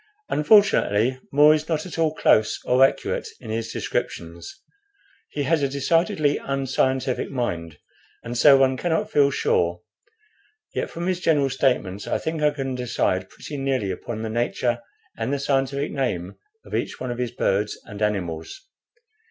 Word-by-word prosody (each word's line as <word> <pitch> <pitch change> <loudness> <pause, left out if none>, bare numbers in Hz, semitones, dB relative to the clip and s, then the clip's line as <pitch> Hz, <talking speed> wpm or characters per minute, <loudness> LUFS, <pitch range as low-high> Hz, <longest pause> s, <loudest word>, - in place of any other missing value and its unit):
"Unfortunately, 130 - +3
More 150 +2 +7
is 155 +1 -2
not 160 0 -1
at 175 -2 -7
all 160 -1 +1
close 110 -6 +3
or 125 +2 +4
accurate 135 - +1
in 110 - -8
his 115 0 -3
descriptions; 85 0 -4 0.7
he 145 - -3
has 155 +2 +2
a 140 - +1
decidedly 145 +1 +1
unscientific 130 -1 -1
mind, 85 - -3 0.5
and 120 +1 -5
so 135 +3 +7
one 130 -1 +3
cannot 160 +3 -1
feel 140 -1 +4
sure; 85 -9 0 0.9
yet - - -2
from 170 +1 -5
his 185 -1 0
general 145 -6 +2
statements 105 -8 0
I - - 0
think 160 -1 -3
I 150 - +5
can 135 -3 -4
decide 115 -7 -1
pretty 145 - -8
nearly 135 -7 -1
upon 110 +4 -5
the 110 - -3
nature 120 +1 -1 0.4
and 115 +3 -1
the 140 - +1
scientific 140 +1 0
name 100 -10 -2 0.3
of - - -12
each - - -2
one 130 -1 -3
of 120 - -5
his 125 -1 -1
birds 105 -3 -1
and 105 0 -9
animals. 90 - -2
130 Hz, 160 wpm, -23 LUFS, 110-145 Hz, 0.9 s, More